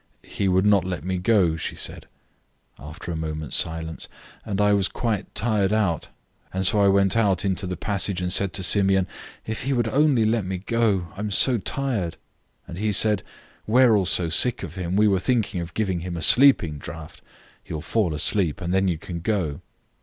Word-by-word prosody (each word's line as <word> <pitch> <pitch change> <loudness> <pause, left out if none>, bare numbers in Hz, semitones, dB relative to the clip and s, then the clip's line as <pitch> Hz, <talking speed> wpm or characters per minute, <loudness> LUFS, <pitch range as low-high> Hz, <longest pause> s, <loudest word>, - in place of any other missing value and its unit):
"He 100 - -2
would 95 +1 +2
not 100 -2 +4
let 90 -4 -4
me 95 0 -2
go," 90 -4 +2
she 80 - -5
said, - - -5 0.7
after 75 +4 -8
a - - -3
moment's 80 -1 -4
silence, 80 0 -4 0.4
"and 100 -3 -4
I 105 0 +4
was 100 -1 +2
quite 110 -4 -3
tired 105 -4 +1
out, 100 -8 0 0.4
and 95 +1 -2
so 105 +2 +2
I 100 - +5
went 100 0 +3
out 100 -4 +2
into 95 0 -1
the 90 -1 -4
passage 100 -1 -1
and 90 -1 -2
said 100 -2 0
to 95 - -2
Simeon, 95 0 +3 0.4
'If 110 0 -4
he 135 +2 -1
would 120 -3 0
only 135 -2 +3
let 110 0 +1
me 95 0 -4
go, 100 -3 0
I - - -11
am 105 0 -2
so 120 +4 +3
tired.' 110 -5 -2 0.5
And 85 - -8
he 105 0 0
said, 105 -1 +2 0.5
'We 125 +4 +4
are 115 -4 +5
also 90 -3 +2
sick 120 +9 +3
of 80 - -7
him; 90 -1 -3
we 105 +1 +4
were 95 -2 +2
thinking 110 -4 0
of 85 0 -8
giving 95 -5 -1
him 85 0 -5
a 80 - -4
sleeping 105 - +4
draught; 75 +2 -9 0.4
he - - -13
will 80 - -4
fall 85 -1 0
asleep, 80 +1 0
and 85 +1 -3
then 95 0 +2
you 85 -3 0
can 85 +1 -7
go. 85 -6 -2
95 Hz, 205 wpm, -23 LUFS, 85-110 Hz, 0.7 s, I